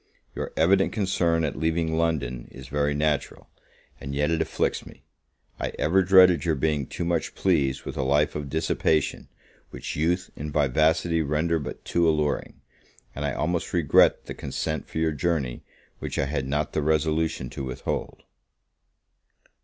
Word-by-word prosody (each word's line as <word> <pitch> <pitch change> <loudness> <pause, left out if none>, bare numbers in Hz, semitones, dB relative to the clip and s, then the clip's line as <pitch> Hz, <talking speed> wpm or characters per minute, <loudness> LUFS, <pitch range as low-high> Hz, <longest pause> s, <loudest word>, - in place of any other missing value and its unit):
Your - - -4
evident 95 +4 +4
concern 85 -5 +1
at 75 -4 -1
leaving 80 0 0
London 70 -7 -1
is 65 -1 -11
very 75 +1 0
natural, 75 -1 -1 0.5
and 70 +1 -6
yet 75 +3 +1
it 80 -1 +1
afflicts - - -1
me. - - -15 0.6
I - - -3
ever 95 +5 +3
dreaded 90 -2 +6
your 80 -3 +1
being 75 -2 0
too 85 - -4
much 85 -1 -1
pleased 70 -8 +1
with - - -5
a - - 0
life 70 +3 +2
of 75 -2 -4
dissipation, 80 0 0 0.4
which - - -6
youth 85 +4 0
and 75 +1 -5
vivacity 80 +4 +2
render 80 +3 0
but 70 - -7
too 85 -1 +2
alluring; 75 -2 -1 0.5
and 75 - -5
I 70 -2 -1
almost 85 +5 -2
regret 85 -6 +4
the - - -6
consent 80 0 -4
for - - -6
your 80 0 +2
journey, 75 -4 -1 0.4
which - - -5
I 70 - +1
had 70 -2 -2
not 75 +2 -1
the 75 - 0
resolution 80 -2 0
to 70 - -5
withhold. 65 -1 -4
80 Hz, 160 wpm, -25 LUFS, 70-85 Hz, 0.6 s, dreaded